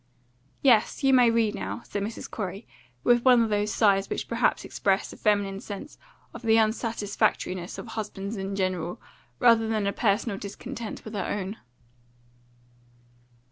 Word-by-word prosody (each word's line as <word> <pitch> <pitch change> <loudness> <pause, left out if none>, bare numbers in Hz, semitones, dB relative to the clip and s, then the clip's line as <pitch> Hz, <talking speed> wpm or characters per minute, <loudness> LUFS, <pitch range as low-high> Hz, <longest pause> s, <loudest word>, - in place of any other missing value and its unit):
"Yes, 250 +1 +4
you 270 0 +5
may 250 -2 +6
read 230 -2 +2
now," 215 - -5
said 205 - -4
Mrs. 220 +3 -5
Corey, 200 0 -5 0.4
with 240 0 +4
one 250 -3 +6
of 220 - -2
those 210 0 +1
sighs 200 -3 +3
which - - -3
perhaps 230 0 +1
express 195 0 0
a - - -10
feminine 200 -2 +1
sense 205 +9 -8 0.3
of - - -8
the 225 -2 +4
unsatisfactoriness 215 -5 0
of - - -7
husbands 210 -1 -5
in 195 0 -4
general, 185 -3 -2 0.4
rather 230 -2 +5
than 215 -2 0
a 200 - 0
personal 205 -1 0
discontent 230 +3 -7
with 220 - -8
her 200 -3 -2
own. 205 +1 -3
210 Hz, 150 wpm, -27 LUFS, 195-230 Hz, 0.4 s, may